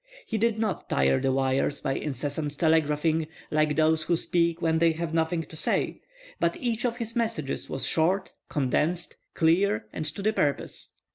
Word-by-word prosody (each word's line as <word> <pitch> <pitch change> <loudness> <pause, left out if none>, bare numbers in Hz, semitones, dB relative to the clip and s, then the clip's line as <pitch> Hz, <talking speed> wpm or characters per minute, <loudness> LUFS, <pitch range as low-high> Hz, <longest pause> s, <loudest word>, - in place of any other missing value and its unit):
He 220 - -2
did 230 0 +2
not 220 -4 -2
tire 65 0 +3
the 135 - +2
wires 135 +2 +1
by 135 - -1
incessant 145 +1 -3
telegraphing, 160 0 +2 0.2
like 155 -1 +2
those 160 0 +3
who 170 +2 +1
speak 170 0 +1
when 160 -1 +1
they 165 0 +4
have 165 0 -4
nothing 165 0 +1
to 160 - -12
say, - - -1 0.4
but - - +1
each 240 -1 -1
of 240 -1 0
his 230 -1 -5
messages 225 - -2
was 135 - -2
short, 185 +4 +1 0.2
condensed, 155 +5 0 0.2
clear, 165 - +3
and - - -3
to 175 +7 -5
the 215 +1 +2
purpose. 145 -8 -1
160 Hz, 170 wpm, -27 LUFS, 150-180 Hz, 0.4 s, they